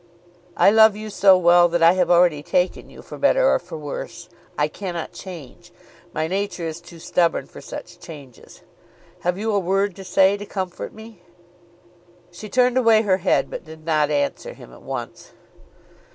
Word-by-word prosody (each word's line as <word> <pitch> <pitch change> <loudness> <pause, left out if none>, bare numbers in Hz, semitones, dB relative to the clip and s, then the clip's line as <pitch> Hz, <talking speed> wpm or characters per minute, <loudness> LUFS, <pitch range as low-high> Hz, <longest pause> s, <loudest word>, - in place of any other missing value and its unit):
I - - +5
love 220 -1 +6
you 215 0 -7
so 195 -1 +5
well 175 0 +5
that 170 0 0
I 165 - +7
have 180 -2 0
already 175 -4 +4
taken 180 +4 -1
you - - -14
for - - -11
better - - +3
or - - +2
for 160 - -9
worse. 155 +3 -8 0.3
I 150 - +1
cannot 175 0 -6
change. 170 -9 -11 0.4
My 155 - -2
nature 190 -1 -3
is 165 +1 -6
too 170 - -14
stubborn 170 +1 0
for - - -13
such - - -10
changes. 140 -7 -13 0.6
Have 180 +1 -2
you 220 +2 -2
a 200 - +2
word 195 +1 -1
to 195 - -9
say 190 +2 +3
to 205 - -8
comfort 185 -3 -5
me?" 220 -3 -14 1.1
She 210 +5 -10
turned 250 +1 +2
away 225 -3 +4
her 190 -3 +2
head, 190 0 +1
but - - -6
did 160 0 -13
not 155 -3 +1
answer 285 - -2
him - - -14
at - - -15
once. - - -8
180 Hz, 180 wpm, -21 LUFS, 170-205 Hz, 1.1 s, I